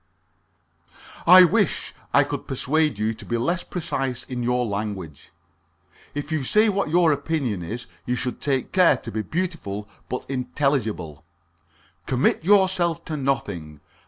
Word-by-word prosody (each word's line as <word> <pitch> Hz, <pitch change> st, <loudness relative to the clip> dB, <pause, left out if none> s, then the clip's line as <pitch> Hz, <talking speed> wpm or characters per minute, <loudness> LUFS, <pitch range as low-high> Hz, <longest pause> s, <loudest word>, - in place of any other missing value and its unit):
"I 185 Hz, +2 st, +10 dB
wish 195 Hz, +1 st, +1 dB, 0.2 s
I -, -, +5 dB
could -, -, -5 dB
persuade 150 Hz, 0 st, +1 dB
you 110 Hz, +2 st, 0 dB
to -, -, -11 dB
be 120 Hz, -, -2 dB
less 170 Hz, +10 st, 0 dB
precise 135 Hz, -8 st, -3 dB
in 125 Hz, -2 st, -5 dB
your 125 Hz, +1 st, +1 dB
language. 100 Hz, -8 st, -5 dB, 0.9 s
If 145 Hz, +1 st, -4 dB
you 155 Hz, -3 st, 0 dB
say 215 Hz, -, +4 dB
what 200 Hz, -5 st, 0 dB
your 170 Hz, 0 st, +4 dB
opinion 140 Hz, -, -1 dB
is, 115 Hz, +8 st, -5 dB, 0.2 s
you 125 Hz, -, +1 dB
should 125 Hz, 0 st, -4 dB
take 135 Hz, -3 st, -1 dB
care 180 Hz, -7 st, +5 dB
to 115 Hz, -, -8 dB
be 110 Hz, -, -2 dB
beautiful 155 Hz, -, -4 dB, 0.2 s
but 125 Hz, -, -4 dB
unintelligible. 125 Hz, -, -2 dB, 0.8 s
Commit 130 Hz, +4 st, +1 dB
yourself 185 Hz, -3 st, +3 dB
to 155 Hz, -, -4 dB
nothing. 100 Hz, -, -3 dB
135 Hz, 140 wpm, -24 LUFS, 110-165 Hz, 0.9 s, I